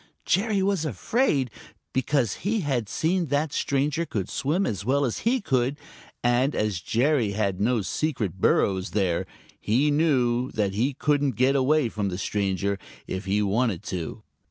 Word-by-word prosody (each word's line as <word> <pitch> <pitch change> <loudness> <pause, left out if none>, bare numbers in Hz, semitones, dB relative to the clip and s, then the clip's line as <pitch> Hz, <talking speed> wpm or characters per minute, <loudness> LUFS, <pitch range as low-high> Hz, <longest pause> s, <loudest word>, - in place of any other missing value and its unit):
Jerry 200 +1 +2
was 195 -4 +1
afraid, 145 - 0 0.4
because 130 -4 +1
he 210 +4 -1
had 130 - -1
seen 175 +1 0
that 145 +2 0
the - - -6
stranger 145 +4 0
could 105 - -3
swim 155 +8 0
as 100 -4 -2
well 140 +5 +2
as 120 - -2
he 260 +2 +2
could, 130 -4 0 0.5
and 120 +4 +2
as 105 -5 -1
Jerry 120 - +1
had 100 -3 -1
no 115 0 +2
secret 105 - -2
burrows 95 +1 +2
there, 90 -4 +1 0.3
he 130 +8 +2
knew 130 -5 +2
that 100 -3 0
he 125 +7 0
couldn't 145 -3 +1
get 130 +4 +3
away 140 +1 +3
from 105 -3 -2
the 90 - -4
stranger 100 0 -1 0.3
if 95 +2 -5
he 100 +2 +1
wanted 105 -1 0
to. 90 -5 -5
125 Hz, 160 wpm, -25 LUFS, 100-150 Hz, 0.5 s, get